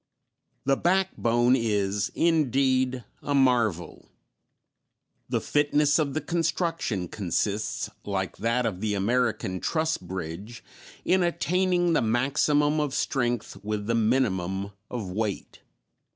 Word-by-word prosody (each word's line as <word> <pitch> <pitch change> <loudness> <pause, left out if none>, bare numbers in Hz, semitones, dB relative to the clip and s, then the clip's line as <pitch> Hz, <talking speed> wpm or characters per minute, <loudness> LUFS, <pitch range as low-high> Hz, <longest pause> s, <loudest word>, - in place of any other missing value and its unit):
The 135 0 +3
backbone 125 -10 +2
is 105 -4 0
indeed 130 -5 +2 0.2
a 145 - -1
marvel. 120 -10 +1 1.2
The - - +1
fitness 145 +1 +2
of 145 -2 -1
the 155 - 0
construction 165 - -1
consists, 105 +3 -2 0.2
like 95 -2 -3
that 115 +3 0
of 100 -5 -3
the 105 -1 0
American 110 -2 0
truss 160 - 0
bridge, 95 +5 -7 0.4
in 185 +1 +3
attaining 175 +1 +1
the - - +3
maximum 145 +6 +2
of 145 -2 -1
strength 120 -7 -1
with 105 0 -3
the 115 - 0
minimum 100 -5 0 0.2
of 110 -7 -5
weight. 105 +1 -3
120 Hz, 110 wpm, -26 LUFS, 105-145 Hz, 1.2 s, The